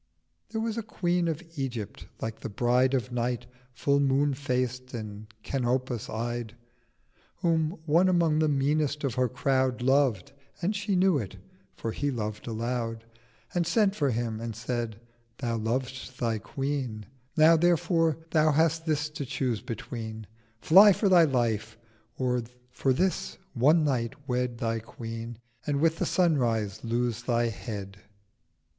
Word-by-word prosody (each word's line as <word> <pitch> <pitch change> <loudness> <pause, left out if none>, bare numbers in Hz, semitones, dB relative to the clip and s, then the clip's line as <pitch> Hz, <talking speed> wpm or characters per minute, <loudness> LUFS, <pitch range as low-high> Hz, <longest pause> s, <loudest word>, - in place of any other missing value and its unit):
There 225 - -3
was 225 0 -1
a - - -1
Queen 175 -5 0
of 165 +1 -2
Egypt 125 -7 -4
like 115 -1 -4
the - - -5
Bride 125 +5 +2
Of 125 -1 -2
Night, 120 0 -1 0.3
Full 140 +2 +2
moon 140 +1 +2
faced 130 -2 -2
and 105 -1 -7 0.2
Canopus 130 -2 -1
eyed, 120 0 -3 0.9
Whom 165 0 +1
one 170 +4 +4
among 165 -4 +3
the 155 - +3
meanest 150 +1 +1
of 135 -4 0
her 125 0 +1
Crowd 130 0 +1
Loved—and 140 - 0
she 200 -1 -1
knew 185 -4 +4
it 100 -4 -6 0.4
(for 115 - -3
he 145 +5 -1
loved 110 -4 -4
aloud), 115 0 -3 0.5
And 175 -2 +1
sent 205 +2 +3
for 145 -8 +1
him, 115 -2 -2
and 115 -2 -4
said 115 -1 -3 0.4
'Thou 115 -3 -1
lov'st 130 +3 -3
thy 115 -3 0
Queen: 135 -4 -3 0.3
Now 160 +2 +7
therefore 165 -1 +2
Thou 155 -1 +4
hast 165 +2 +2
this 150 -1 +1
to 150 - -4
choose 130 -5 -2
between: 110 -1 -6 0.4
Fly 195 +5 +8
for 200 +2 +1
thy 175 -3 +7
Life: 115 -5 0 0.4
or 125 -1 +1 0.3
for 135 - +1
this 185 +8 0 0.2
one 150 +6 +4
night 125 -6 0
Wed 125 -1 -1
Thy 115 0 -1
Queen, 115 0 -7 0.3
and 145 -1 +1
with 165 +1 +2
the - - +1
Sunrise 120 - +1
lose 120 0 -1
thy 120 -1 +1
Head.' 100 -3 -6
130 Hz, 145 wpm, -28 LUFS, 115-155 Hz, 0.9 s, Fly